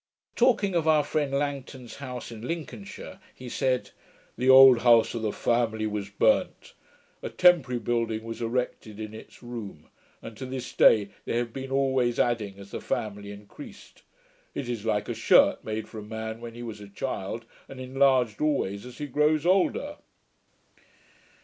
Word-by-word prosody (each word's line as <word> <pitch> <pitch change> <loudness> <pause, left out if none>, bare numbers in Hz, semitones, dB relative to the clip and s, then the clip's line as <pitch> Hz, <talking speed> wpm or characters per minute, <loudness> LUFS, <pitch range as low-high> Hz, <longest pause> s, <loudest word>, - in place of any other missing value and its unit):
Talking 235 -6 +3
of 165 -2 0
our 155 -2 +4
friend 145 -2 -1
Langton's 140 -3 -4
house 125 -3 -7
in 110 -2 -9
Lincolnshire, 185 +4 -7 0.2
he 130 - -10
said, 130 +1 -1 0.4
'the 125 +2 0
old 130 -2 +9
house 115 -2 +5
of 115 - -4
the 110 -1 -1
family 110 -2 0
was 105 -2 -3
burnt. 100 - +1 0.5
A - - -4
temporary 165 -9 +4
building 115 -1 -1
was 115 +1 -7
erected 115 -3 -3
in 110 0 -6
its 110 - -13
room; 110 -10 -8 0.3
and 115 - -10
to 130 - -6
this 130 -1 -6
day 105 -2 +5 0.2
they - - -1
have 120 -1 -2
been 135 0 -6
always 130 -3 +1
adding 110 -5 0
as 100 0 -12
the - - -5
family 100 -1 -4
increased. 105 +8 -13 0.5
It 130 - -4
is 115 -3 -4
like 105 -1 0
a - - -2
shirt - - +4
made 110 0 -4
for 110 - -9
a - - -7
man 110 +1 -6
when 115 -1 -8
he 120 - -8
was 110 -3 -7
a 100 - -11
child, 110 0 -5 0.2
and 135 - -10
enlarged 130 -3 +2
always 125 -8 -1
as 125 - -12
he 150 - -4
grows 150 +2 +1
older.' 195 +10 +1
120 Hz, 170 wpm, -27 LUFS, 110-135 Hz, 0.5 s, old